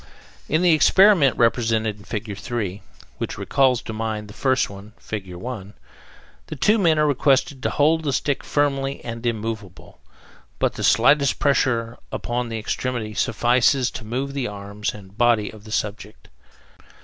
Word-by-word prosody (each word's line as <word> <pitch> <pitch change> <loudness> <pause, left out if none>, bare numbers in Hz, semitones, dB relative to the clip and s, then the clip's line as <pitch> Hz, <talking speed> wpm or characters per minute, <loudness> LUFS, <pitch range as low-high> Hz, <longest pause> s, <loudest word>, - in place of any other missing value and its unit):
In 160 +4 +2
the 175 -2 +5
experiment 170 - +5
represented 115 -2 +1
in 100 - -16
Fig. 105 -1 -5
3, 100 -2 -4 0.4
which - - -4
recalls 130 -3 +2
to 110 - -6
mind 110 -1 -3
the - - -10
first 130 +1 +1
one 100 +2 -12
(Fig. 100 -4 -6
1), 105 0 -7 0.7
the 155 - -6
two 210 - +3
men 165 -5 +3
are 150 - +3
requested 140 0 +2
to - - 0
hold 160 +3 +2
the 150 -3 -1
stick 140 +1 -1
firmly 140 -1 -1
and 115 0 -6
immovable, 110 -5 -5 0.6
but - - 0
the - - -6
slightest 135 +5 +4
pressure 120 -5 +1
upon 120 0 -3
the 115 - -3
extremity 110 0 -3
suffices 120 +5 +2
to - - -7
move 130 +5 -3
the 135 -3 -2
arms 100 0 -5
and 100 0 -14
body 120 -3 +3
of 110 -1 -15
the 110 - -11
subject. 105 0 -4
120 Hz, 160 wpm, -22 LUFS, 105-140 Hz, 0.7 s, the